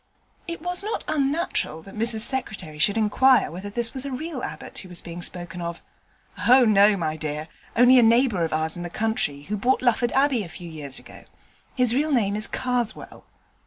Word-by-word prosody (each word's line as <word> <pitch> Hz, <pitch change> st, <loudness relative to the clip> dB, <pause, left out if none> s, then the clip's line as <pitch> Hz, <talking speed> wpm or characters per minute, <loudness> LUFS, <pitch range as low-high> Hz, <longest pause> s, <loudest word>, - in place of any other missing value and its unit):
It 335 Hz, -1 st, -6 dB
was 355 Hz, +1 st, +1 dB
not 430 Hz, +2 st, -3 dB
unnatural 285 Hz, -, -1 dB
that 195 Hz, -, -13 dB
Mrs 220 Hz, 0 st, -1 dB
Secretary 200 Hz, -, -2 dB
should 200 Hz, +7 st, +2 dB
inquire 250 Hz, +4 st, +3 dB
whether 185 Hz, +4 st, -7 dB
this 230 Hz, +2 st, 0 dB
was 265 Hz, -, -2 dB
a 280 Hz, -, -5 dB
real 285 Hz, +1 st, -5 dB
Abbot -, -, -7 dB
who 185 Hz, -, -10 dB
was 180 Hz, -, -4 dB
being 170 Hz, 0 st, -8 dB
spoken 175 Hz, 0 st, -4 dB
of. 170 Hz, 0 st, -5 dB, 0.7 s
'Oh 255 Hz, 0 st, +7 dB
no, 205 Hz, -1 st, +5 dB
my 155 Hz, -3 st, -2 dB
dear: 155 Hz, 0 st, -5 dB, 0.3 s
only 250 Hz, +2 st, +7 dB
a -, -, +6 dB
neighbour 230 Hz, -5 st, +3 dB
of 165 Hz, -, -2 dB
ours 160 Hz, +1 st, -1 dB
in 175 Hz, -, -7 dB
the 175 Hz, -, -5 dB
country 170 Hz, -9 st, 0 dB
who 210 Hz, +7 st, -4 dB
bought 250 Hz, +6 st, +1 dB
Lufford 240 Hz, 0 st, +2 dB
Abbey 270 Hz, -4 st, +2 dB
a 175 Hz, -, -9 dB
few 175 Hz, +1 st, -10 dB
years 145 Hz, -4 st, -6 dB
ago. -, -, -12 dB, 0.5 s
His 250 Hz, -3 st, +3 dB
real 300 Hz, +4 st, +1 dB
name 210 Hz, -7 st, +1 dB
is 215 Hz, +1 st, 0 dB
Karswell.' 245 Hz, -3 st, -3 dB
220 Hz, 200 wpm, -24 LUFS, 175-255 Hz, 0.7 s, Oh